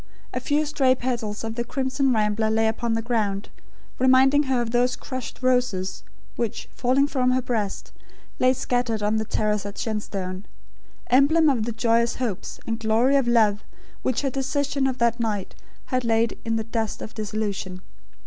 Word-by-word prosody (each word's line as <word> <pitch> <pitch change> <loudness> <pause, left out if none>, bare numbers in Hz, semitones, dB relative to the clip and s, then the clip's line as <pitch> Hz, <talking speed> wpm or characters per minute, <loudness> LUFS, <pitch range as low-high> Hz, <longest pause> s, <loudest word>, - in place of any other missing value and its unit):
A - - -1
few 300 +1 +1
stray 275 -3 +3
petals 235 -5 -3
of 225 0 -3
the 235 +1 -2
crimson 265 +2 0
rambler 215 -1 +1
lay 220 0 +2
upon 230 +1 -1
the 225 0 -1
ground; 210 -4 -1 0.5
reminding 260 +2 +5
her 260 -2 +2
of 235 -1 -2
those 245 +1 +2
crushed 255 -1 -7
roses, 245 -8 +1 0.3
which, 230 -3 -3
falling 260 +3 +2
from 260 -3 +1
her 255 0 +2
breast, 215 -6 -2 0.5
lay 255 - +5
scattered 245 -4 -1
on 210 +1 +2
the 220 - -1
terrace 210 -1 0
at 200 0 -7
Shenstone, 195 -3 -4 0.7
emblem 295 +5 +5
of 235 -6 +1
the 235 - -2
joyous 230 +1 +2
hopes 235 -8 -4
and 225 0 -2
glory 230 +5 +3
of 270 -3 +3
love 215 -3 +3 0.4
which 255 - 0
her 275 - 0
decision 275 +1 0
of 260 -1 -2
that 235 0 +1
night 210 -4 -2 0.4
had 255 0 +2
laid 230 0 +2
in 225 -1 -1
the 220 - -1
dust 225 -1 -3
of 220 - -8
disillusion. 205 -4 -4
235 Hz, 170 wpm, -24 LUFS, 215-255 Hz, 0.7 s, reminding